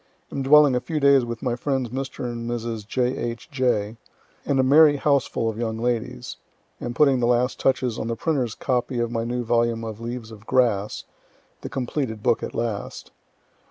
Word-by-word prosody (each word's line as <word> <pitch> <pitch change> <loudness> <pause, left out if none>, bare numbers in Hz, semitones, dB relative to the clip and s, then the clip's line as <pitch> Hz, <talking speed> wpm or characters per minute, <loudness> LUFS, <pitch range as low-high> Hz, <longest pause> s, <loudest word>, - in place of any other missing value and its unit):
Am 140 - -3
dwelling 145 0 +6
a - - +2
few 155 +4 -3
days 140 -2 +5
with 120 -1 -6
my 125 -2 0
friends 130 -1 -1
Mr. 135 +2 -5
and 120 -1 -4
Mrs. 115 -3 -4
J. 125 +2 0
H. 120 +5 -5
J., 120 -5 0 0.5
and 135 - +2
a - - +4
merry 145 +3 +6
houseful 140 -5 +1
of 110 0 -3
young 110 -2 -2
ladies. 120 -1 -3 0.4
Am 120 0 -4
putting 140 -2 +4
the 120 - +1
last 125 +1 +1
touches 130 -3 +1
on - - -3
the 115 - -2
printer's 130 -6 -1
copy 125 -1 -1
of 120 -1 -1
my 115 -1 -1
new 120 +1 -2
volume 115 0 +1
of 110 0 -6
"Leaves 115 -1 -6
of 105 0 -13
Grass" 110 -5 +1 0.6
the - - -6
completed 125 -4 -3
book 120 -2 +2
at - - -6
last. 115 -3 -4
120 Hz, 190 wpm, -24 LUFS, 115-130 Hz, 0.6 s, dwelling